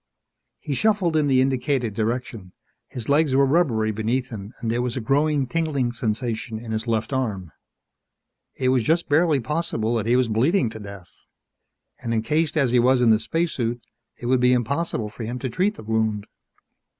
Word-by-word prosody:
_ - - -59 0.5
He 145 - -5
shuffled 195 - +1
in 150 -2 +2
the 130 -2 +4
indicated 130 -3 0
direction. 110 -3 -3 0.3
His 120 -3 -7
legs 145 -1 +3
were 140 0 +5
rubbery 130 -8 +2
beneath 115 +5 -2
him 105 -2 -7
and 115 -2 -2
there 120 +1 0
was 125 0 -2
a - - 0
growing 140 +4 +1
tingling 140 -3 -1
sensation 115 -1 -3
in 115 0 -8
his 110 +2 -3
left 115 +2 -1
arm. 105 -10 -2 1.0
It 130 -1 0
was 130 -1 +3
just 165 +9 +1
barely 155 -1 +3
possible 125 -5 -1
that 110 -1 -2
he 120 - +3
was 130 -1 +3
bleeding 120 - +2
to 110 - -8
death. 100 -3 -10 0.9
And 115 -1 -2
encased 155 +7 0
as 135 -5 +2
he 125 - +4
was 130 +2 +4
in 120 -2 +4
the 110 - +4
spacesuit, 125 -7 -1 0.4
it - - -8
would 130 +1 +3
be 125 0 +4
impossible 125 -2 -1
for 115 - -8
him 120 +3 -4
to 130 0 -4
treat 195 - 0
the - - -11
wound. 110 -1 -1
125 Hz, 185 wpm, -23 LUFS, 110-140 Hz, 1.0 s, were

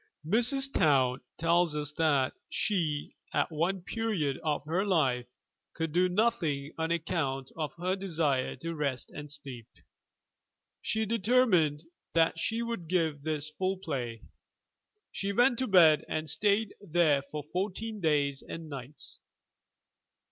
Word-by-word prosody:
Mrs. 245 - +5
Towne 130 -4 +3 0.2
tells 165 -1 +2
us 150 -1 -2
that 150 -4 +1 0.2
she, 160 -8 -1 0.2
at 145 +3 +1
one 175 +4 -1
period 180 - -1
of 150 -2 -1
her 170 +5 0
life, 135 -11 +1 0.5
could 160 -1 -2
do 180 +3 +3
nothing 175 -9 0
on 160 0 -2
account 155 -6 -2
of 155 -2 -4
her 180 +2 -1
desire 160 -9 -1
to 165 +6 -5
rest 140 -5 -3
and 145 0 -8
sleep. 135 -6 -6 1.1
She 220 0 -1
determined 210 - +2 0.3
that 165 0 +3
she 225 +6 -1
would 230 -8 -4
give 160 -4 0
this 155 0 -3
full 190 +4 -1
play; 125 - -4 0.9
she 200 +1 -2
went 240 +3 +3
to 260 - 0
bed 165 -6 +6
and 155 0 -2
stayed 205 +7 +1
there 165 -6 +2
for 150 -1 -5
fourteen 210 +4 -3
days 145 -4 +1
and 165 -1 -8
nights! 140 +1 -9
165 Hz, 135 wpm, -30 LUFS, 145-195 Hz, 1.1 s, bed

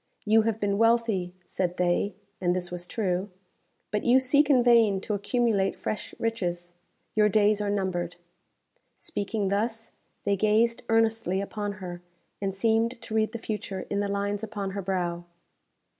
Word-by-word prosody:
"You 220 +1 +5
have 220 0 -1
been 200 -1 0
wealthy," 225 -6 +2
said 180 -1 -2
they 180 +2 +1 0.3
(and 180 -1 +2
this 180 -1 -3
was 175 0 -4
true), 190 -2 -1 0.6
"but 210 0 -1
you 245 +2 +5
seek 280 +3 +3
in 255 -4 +5
vain 230 -5 +5
to 215 - -2
accumulate 205 -1 +1
fresh 215 - -4
riches. 175 -6 -2 0.4
Your 210 -1 +5
days 210 0 +3
are 205 - -1
numbered." 180 -3 -1 0.8
Speaking 205 - -2
thus, 225 +3 -1 0.3
they 200 0 +2
gazed 215 +3 +2
earnestly 225 -4 +2
upon 205 +1 -3
her, 180 -3 -7 0.4
and 195 -1 0
seemed 225 +4 +1
to 230 -1 -8
read 220 0 +2
the 235 - -4
future 210 -4 -4
in 200 - 0
the 205 - 0
lines 200 0 -1
upon 205 -3 -4
her 200 +1 -4
brow. 175 -2 -2
205 Hz, 160 wpm, -27 LUFS, 190-225 Hz, 0.8 s, You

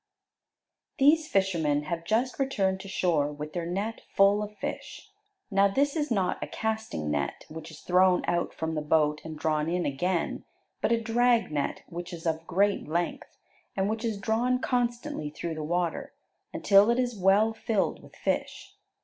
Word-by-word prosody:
These 305 +3 +4
fishermen 165 - +1
have 165 +2 -4
just 240 +8 0
returned 195 -9 +1
to 195 - -9
shore 165 -6 +1
with 150 +1 -7
their 170 -2 -3
net 200 +6 -3
full 200 +1 +5
of 210 0 -6
fish. - - -6 0.4
Now 195 0 +5
this 280 +9 +1
is 300 -2 -1
not 195 -6 0
a - - -4
casting 220 - -3
net, 70 -1 -2
which 160 0 -8
is 155 -1 -12
thrown 180 0 +3
out 175 0 0
from 160 0 -3
the 155 - -1
boat 150 0 +2
and 160 -1 -7
drawn 155 0 0
in 175 +1 0
again, 170 +5 -1 0.4
but - - +1
a 230 - +3
drag 235 -2 +2
net 145 -2 -2
which 175 +1 -7
is 165 -1 -8
of 160 0 -1
great 200 +3 +1
length, 170 +3 -3 0.4
and 190 0 +1
which 220 +2 -2
is 225 -3 -1
drawn 230 +5 +1
constantly 245 - -1
through 165 +2 -5
the 155 - -5
water 175 +2 -2 0.4
until 200 +2 +5
it 235 - +3
is 245 -2 0
well 200 +3 +3
filled 220 -2 -1
with - - -16
fish. - - -3
190 Hz, 175 wpm, -28 LUFS, 160-225 Hz, 0.4 s, full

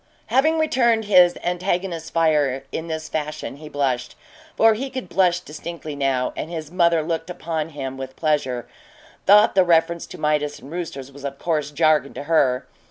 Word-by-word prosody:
Having 310 +5 +4
returned 235 -8 +2
his 180 -3 +5
antagonists's 175 -2 -2
fire 150 -5 +1
in 165 - -4
this 160 -1 -4
fashion, 150 -2 -4
he 155 +1 -10
blushed 130 -4 -1 0.4
for 225 0 +6
he 265 +5 -4
could 260 -7 -6
blush 180 0 +2
distinctly 155 -1 -7
now 135 -2 0
and 160 - -5
his 160 -2 -6
mother 170 -3 +3
looked 165 +2 -3
upon 165 -3 -3
him 135 -3 -6
with 130 0 -7
pleasure, 140 -6 -1 0.6
though 210 +2 +7
the 190 - +5
reference 170 -1 +2
to - - -10
Midas 150 -1 0
and 140 - -13
roosters 150 -6 -6
was 140 0 -13
of 140 -1 -5
course 155 -3 -1
jargon 150 -2 +2
to - - -5
her. 135 -5 +2
160 Hz, 170 wpm, -22 LUFS, 145-180 Hz, 0.6 s, though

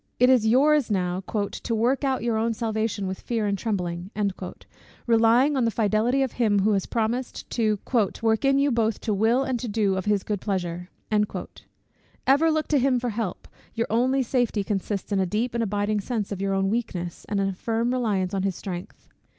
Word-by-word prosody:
It 250 +1 +6
is 240 -4 +4
your's 280 +3 +4
now 180 -2 0
"to 215 +2 -2
work 245 +6 +1
out 265 -3 0
your 235 -1 0
own 225 +1 0
salvation 220 -2 -2
with 190 0 -4
fear 230 -3 -1
and 200 -1 +1
trembling," 180 -4 -3 1.0
relying 235 +5 +4
on 260 - +2
the 230 - +3
fidelity 225 +4 +1
of 260 - -2
him 215 -4 +1
who 215 +3 +3
has 195 -2 0
promised 235 +2 -2
to 215 -3 +1 0.5
"work 220 +1 +2
in 275 0 +4
you 280 0 +3
both 225 -2 +1
to 215 - -1
will 225 +6 +2
and 260 -3 -1
to 240 - -4
do 205 -3 +1
of 190 - -3
his 210 -2 +1
good 205 -3 -3
pleasure." 180 -3 -3 1.4
Ever 285 +5 +4
look 310 -1 0
to 295 - +3
him 255 -1 +2
for 245 0 -2
help: 215 -4 -4 0.3
your 230 - 0
only 260 +4 +2
safety 240 -4 0
consists 200 0 -3
in 200 - +2
a 190 - +1
deep 225 +6 -1
and 235 - 0
abiding 205 0 0
sense 215 -2 -3
of 195 -1 -4
your 195 0 0
own 195 0 +1
weakness, 185 -7 -3
and 205 -1 0
in 195 - +1
a 195 - -2
firm 230 +5 -1
reliance 205 -7 0
on 195 - 0
his 195 -1 -1
strength. 180 -1 -7
220 Hz, 200 wpm, -25 LUFS, 200-245 Hz, 1.4 s, It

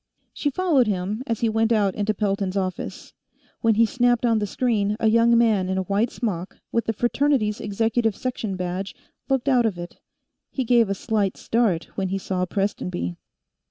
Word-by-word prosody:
She 290 - -1
followed 290 -6 +2
him 200 +3 -2
as 230 -3 -2
he 230 - +3
went 225 +1 +1
out 205 -4 +3
into 210 +2 -1
Pelton's 195 -1 -1
office. 185 -1 -4 0.5
When 225 -2 +3
he 230 +2 +5
snapped 245 +1 +2
on 230 -2 +3
the 205 - -1
screen, 210 -2 0
a 225 - +2
young 230 +1 +4
man 215 -6 +3
in 190 - -1
a 190 - 0
white 205 +5 +1
smock, 190 -8 -4
with 230 - 0
the - - +1
Fraternities 240 -2 +1
Executive 225 +1 0
Section 230 -6 -3
badge, 185 +2 -4 0.3
looked 270 -1 0
out 250 -4 +4
of 195 -5 -3
it. 175 0 -8 0.5
He 265 - -2
gave 235 -3 +3
a 200 - 0
slight 205 -2 -1
start 220 -8 +1
when 195 -1 -1
he 195 - -1
saw 185 -1 -2
Prestonby. 180 - -2
215 Hz, 185 wpm, -23 LUFS, 195-235 Hz, 0.5 s, he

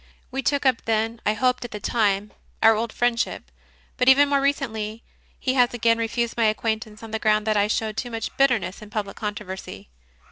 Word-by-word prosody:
We 270 +1 -2
took 285 +2 0
up 255 -3 +2
then, 225 +1 0
I 210 - +2
hoped 250 +3 +1
at 240 - -6
the 210 - -6
time, 205 -2 0 0.3
our 225 0 +7
old 225 +1 -2
friendship; 240 -1 -1 0.5
but 250 0 +4
even 280 +2 +6
more 280 -1 +2
re 280 +1 +4
cently 220 -5 -5 0.4
he 260 - 0
has 245 -2 +3
again 230 -1 +2
refused 230 +1 -1
my 230 - +2
acquaintance, 220 0 -1
on 225 - -9
the 220 - -2
ground 215 0 +2
that 215 -1 +1
I 205 0 +3
showed 220 0 -2
too 245 +2 -3
much 225 -1 -5
"bitterness" 245 -8 +1
in 215 - -11
public 205 -2 -4
controversy. 190 - -6
225 Hz, 205 wpm, -24 LUFS, 215-245 Hz, 0.5 s, our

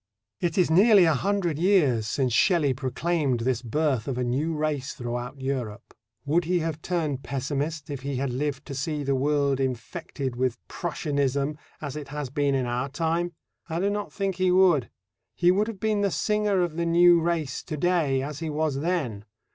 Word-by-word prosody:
It 170 -2 -1
is 180 -4 +3
nearly 200 +2 +7
a 160 - +4
hundred 175 -1 0
years 150 - +3
since 125 +1 0
Shelley 155 - +3
proclaimed 135 0 -1
this 120 -1 0
birth 130 -1 0
of 130 -3 -2
a 125 - 0
new 135 +7 0
race 150 -3 -2
throughout 120 +1 -5
Europe. 130 -5 -4 0.3
Would 160 +4 +2
he 180 +2 +1
have 160 -2 -2
turned 155 -7 -1
pessimist 145 +3 -3
if 140 -2 -5
he 140 +1 -3
had 135 0 -1
lived 140 +2 -2
to 140 - -7
see 145 +2 -2
the 140 0 0
world 140 0 +1
infected 130 +1 -3
with 125 -1 0
Prussianism 145 -3 -1 0.3
as 145 -2 -5
it 150 -2 -6
has 145 -2 -5
been 140 0 +1
in 130 -2 0
our 120 +3 -2
time? 165 +4 -1 0.4
I 165 +1 -2
do 200 +2 +1
not 205 0 -3
think 195 -3 -2
he 185 0 +2
would. 180 -8 +4 0.5
He 175 0 +4
would 205 +3 +2
have 225 -4 -6
been 215 0 +1
the 200 - +2
singer 210 -1 +1
of 170 -2 -3
the 170 - 0
new 170 0 +6
race 160 -5 -1
to 155 - -6
day 150 -6 +1
as 145 +1 -5
he 165 -1 -3
was 150 -2 -1
then. 145 - -1
150 Hz, 190 wpm, -26 LUFS, 135-175 Hz, 0.5 s, nearly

